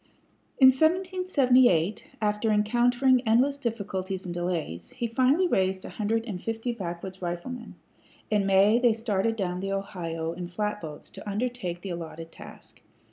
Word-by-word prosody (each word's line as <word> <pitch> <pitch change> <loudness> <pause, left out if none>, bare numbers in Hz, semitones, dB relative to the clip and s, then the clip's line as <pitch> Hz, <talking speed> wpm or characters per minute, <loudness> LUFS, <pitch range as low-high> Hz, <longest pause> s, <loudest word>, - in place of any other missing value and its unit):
In 260 -1 +8
1778, 265 - +2
after 210 +1 0
encountering 240 +4 +3
endless 265 +6 +3
difficulties 195 -6 -3
and 175 - -4
delays, 175 - -3
he 250 -1 -3
finally 260 +10 +3
raised 190 - 0
a - - -6
hundred 225 +2 -1
and 195 -6 -5
fifty 225 +2 -2
backwoods 190 -3 -6
riflemen. 185 +8 -5 0.6
In 205 -2 +2
May 200 +4 +5
they 240 -2 +4
started 225 -1 0
down 180 -4 -2
the 195 +1 -2
Ohio 165 -4 -4
in 175 0 -6
flatboats 175 -4 -5
to - - -8
undertake 205 -5 -3
the 195 - -5
allotted 165 -1 -7
task. - - -13
210 Hz, 140 wpm, -27 LUFS, 180-245 Hz, 0.6 s, In